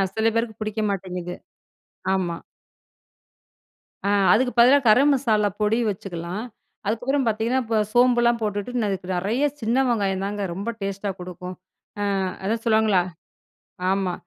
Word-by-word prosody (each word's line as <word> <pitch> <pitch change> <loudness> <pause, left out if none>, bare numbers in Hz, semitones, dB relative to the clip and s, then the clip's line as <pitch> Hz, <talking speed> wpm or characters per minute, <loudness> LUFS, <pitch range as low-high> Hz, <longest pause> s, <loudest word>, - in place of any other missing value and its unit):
சில 220 0 +2
பேருக்கு 230 -2 -1
புடிக்க 215 0 -2
மாட்டேங்குது. 180 -2 -4 0.8
ஆமா. 175 -3 -1 1.7
ஆ, - - +2 0.2
அதுக்கு 250 +3 +2
பதிலா 255 +4 +8
கரம் 275 +7 +6
மசாலா 215 -6 +2
பொடி 210 +2 +2
வச்சுக்கலாம். 185 +1 -5 0.4
அதுக்கப்புறம் 250 +5 0
பார்த்தீங்கன்னா, 225 +4 +1
இப்போ 225 -1 -1 0.2
சோம்புலாம் 240 -1 +4
போட்டுட்டு 215 +3 -2
அதுக்கு 190 -2 -4
நெறைய 220 +10 0 0.2
சின்ன 230 +4 +1
வெங்காயம் 195 -5 0
தாங்க 205 0 -3
ரொம்ப 200 +6 -4
டேஸ்ட்டா 195 +1 -3
கொடுக்கும். 180 0 -7 0.7
அ, - - -1 0.2
அதான் 225 +3 -1
சொல்லுவாங்களா? 220 -5 +3 0.9
ஆமா. 190 -2 0
215 Hz, 120 wpm, -23 LUFS, 195-235 Hz, 1.7 s, பதிலா